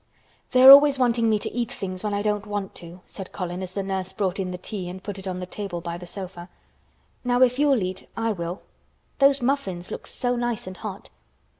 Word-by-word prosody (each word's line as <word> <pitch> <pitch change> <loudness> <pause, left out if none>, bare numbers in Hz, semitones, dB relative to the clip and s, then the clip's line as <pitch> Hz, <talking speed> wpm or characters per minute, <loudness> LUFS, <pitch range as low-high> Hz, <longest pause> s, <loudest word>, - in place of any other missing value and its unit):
"They 255 0 +4
are 265 - +13
always 280 0 +9
wanting 235 -3 +2
me 215 - +3
to - - -4
eat 240 0 -2
things 185 -6 -5
when 210 - -1
I 205 0 -1
don't 210 -1 -1
want 205 -2 -4
to," 175 +1 -11
said 195 -2 -9
Colin, 180 -1 -4
as 185 -1 -6
the 200 - -2
nurse 190 -1 -3
brought 195 -1 -1
in 185 -1 -2
the 180 - -5
tea 185 -1 -5
and 185 +1 -9
put 200 -2 -5
it 190 - -7
on 180 -1 -3
the 180 - -4
table 190 -1 -5
by 170 0 -5
the 180 - -10
sofa. 180 -1 -8 0.7
"Now, 245 0 +3
if 250 +1 +2
you'll 275 -7 +3
eat 185 0 -5
I 230 0 0
will. 175 -2 -5 0.6
Those 275 -1 +5
muffins 195 -10 -1
look - - -5
so 245 0 -1
nice 240 -2 -2
and 185 -1 -8
hot. 205 -1 -7
200 Hz, 230 wpm, -24 LUFS, 185-240 Hz, 0.7 s, are